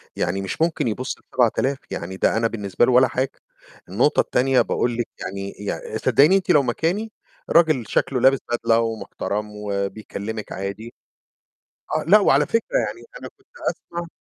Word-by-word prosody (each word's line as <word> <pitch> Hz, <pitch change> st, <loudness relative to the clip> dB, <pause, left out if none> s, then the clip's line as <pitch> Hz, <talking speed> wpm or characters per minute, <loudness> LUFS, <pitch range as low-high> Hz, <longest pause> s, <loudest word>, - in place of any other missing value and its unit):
يعني 95 Hz, +3 st, -1 dB
مش 95 Hz, -, -5 dB
ممكن 165 Hz, -6 st, +1 dB
يبص 130 Hz, +4 st, -3 dB
ل7000 130 Hz, +3 st, 0 dB
يعني 95 Hz, +2 st, -5 dB
ده -, -, +2 dB
أنا 115 Hz, 0 st, +2 dB
بالنسبة 105 Hz, 0 st, 0 dB
لُه -, -, +2 dB
ولا 125 Hz, +1 st, +6 dB
حاجة، 130 Hz, +1 st, -1 dB, 0.6 s
النقطة 125 Hz, -, +2 dB
التانية 130 Hz, +1 st, +3 dB
باقول 120 Hz, -1 st, -1 dB
لِك 120 Hz, -, -1 dB
يعني 100 Hz, +1 st, -5 dB
يعني 105 Hz, +2 st, -5 dB
صدقيني 140 Hz, -, +4 dB
أنتِ 185 Hz, -, -4 dB
لو 145 Hz, -4 st, +5 dB
مكاني، 175 Hz, -, -1 dB, 0.4 s
راجل 155 Hz, -8 st, +4 dB
شَكلّه 130 Hz, -2 st, 0 dB
لابس 135 Hz, +1 st, +5 dB
بدلة 115 Hz, -1 st, +2 dB
ومحترم 105 Hz, -1 st, -3 dB
وبيكلمك 105 Hz, +1 st, -4 dB
عادي، 100 Hz, +4 st, -6 dB, 1.0 s
آه، -, -, -2 dB
لأ، 210 Hz, +4 st, +8 dB
وعلى 145 Hz, -5 st, +4 dB
فكرة -, -, 0 dB
يعني -, -, -7 dB, 0.2 s
أنا -, -, -7 dB
كنت 400 Hz, -, -30 dB, 0.2 s
أسمع 170 Hz, 0 st, -7 dB
120 Hz, 155 wpm, -22 LUFS, 105-140 Hz, 1.0 s, لأ